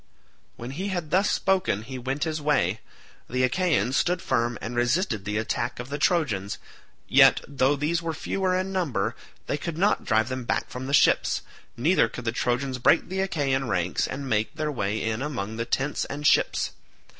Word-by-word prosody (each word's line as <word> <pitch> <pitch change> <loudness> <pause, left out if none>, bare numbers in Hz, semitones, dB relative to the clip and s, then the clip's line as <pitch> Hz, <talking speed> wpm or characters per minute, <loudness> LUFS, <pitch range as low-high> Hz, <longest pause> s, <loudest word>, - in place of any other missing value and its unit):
When 120 +2 -7
he 185 +8 -4
had 175 -6 -3
thus 190 +4 +3
spoken 185 - +1
he 130 +2 -7
went 135 +3 -2
his 155 -2 -2
way. 110 - +1 0.5
The 125 +1 0
Achaeans 130 - +1
stood 180 +3 +2
firm 120 -5 0
and 120 +2 -5
resisted 120 - 0
the 105 +1 -2
attack 110 +1 -2
of 120 +2 -6
the 145 +1 -4
Trojans, 125 - +1 0.5
yet 135 0 +6
though 140 0 +2
these 155 +4 0
were 165 -1 -3
fewer 185 +3 -1
in 190 +1 -2
number, 140 - -1 0.3
they 145 - -2
could 170 0 -4
not 200 +4 +2
drive 110 -1 +2
them 130 0 -3
back - - -2
from 130 +1 -5
the 140 - -3
ships, - - +3 0.3
neither 160 +10 +3
could 125 - -8
the 115 - +1
Trojans 125 +2 -1
break - - +3
the 190 +1 -3
Achaean 135 -8 0
ranks 90 -5 0
and 135 +1 -5
make 110 +4 0
their 155 -1 -2
way 105 -4 -1
in 110 +1 -1
among 110 -7 -4
the 115 - -2
tents 135 +4 -1
and 145 +1 -6
ships. - - +3
135 Hz, 190 wpm, -26 LUFS, 115-160 Hz, 0.5 s, yet